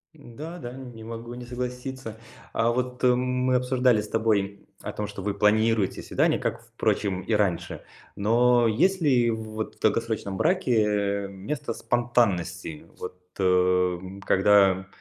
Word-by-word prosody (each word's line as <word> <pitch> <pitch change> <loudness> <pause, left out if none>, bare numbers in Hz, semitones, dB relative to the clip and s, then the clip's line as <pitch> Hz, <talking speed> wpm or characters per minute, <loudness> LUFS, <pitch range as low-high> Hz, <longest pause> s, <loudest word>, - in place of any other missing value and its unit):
М-да, 150 +4 -9
да, 120 -5 -7
не 125 -4 -10
могу 115 +1 -7
не 120 0 -8
согласиться. 125 -1 -5 0.4
А 115 +1 +2
вот, 125 +1 -3
мы 125 0 +2
обсуждали 125 -2 +3
с 105 - -8
тобой 105 -3 0 0.2
о - - -5
том, 105 - -3
что 100 -1 -8
вы 100 +1 -1
планируете 105 0 +2
свидания, - - +1
как, - - -2
впрочем, 95 -3 -1
и 95 - -2
раньше. 100 -5 0 0.3
Но 120 +3 +3
есть 185 - +2
ли 125 -6 +3
в, 110 0 -4
вот, 110 0 -6
долгосрочном 110 -4 0
браке, 105 - +1
э, - - -5
место 100 +9 -5
спонтанности? 95 -10 0
Вот, 90 0 -7 0.2
эм, 90 0 +1
когда 95 -1 +4
110 Hz, 140 wpm, -26 LUFS, 100-125 Hz, 0.4 s, когда